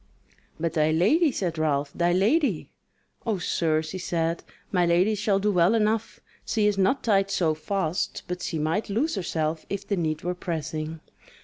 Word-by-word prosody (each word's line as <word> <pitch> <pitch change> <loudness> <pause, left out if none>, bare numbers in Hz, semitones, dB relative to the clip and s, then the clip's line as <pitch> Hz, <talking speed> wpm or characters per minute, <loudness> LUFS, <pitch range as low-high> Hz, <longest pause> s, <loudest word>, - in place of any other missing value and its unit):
"But 165 0 -1
thy 155 -2 +2
lady," 245 - +3
said 175 -8 -2
Ralph, 145 -2 0
"thy 175 0 +1
lady?" 225 - +1 0.5
"O 220 -4 0
sir," 160 -3 0
she 160 +4 -6
said; 165 -1 -1 0.3
"My 180 -2 +2
lady 175 +5 +3
shall 210 -1 +1
do 205 +2 +1
well 180 +3 +4
enough: 220 0 0 0.2
she 215 -2 0
is 210 -1 +3
not 195 +8 +1
tied 195 -3 +2
so 165 -5 +1
fast, 180 +2 -2
but 180 0 -4
she 165 - -3
might 160 +8 -1
loose 250 +11 0
herself 160 -5 -2
if 200 0 -4
the 200 - 0
need 155 -2 -1
were 180 +1 -1
pressing. 160 -2 -4
180 Hz, 175 wpm, -26 LUFS, 160-205 Hz, 0.5 s, well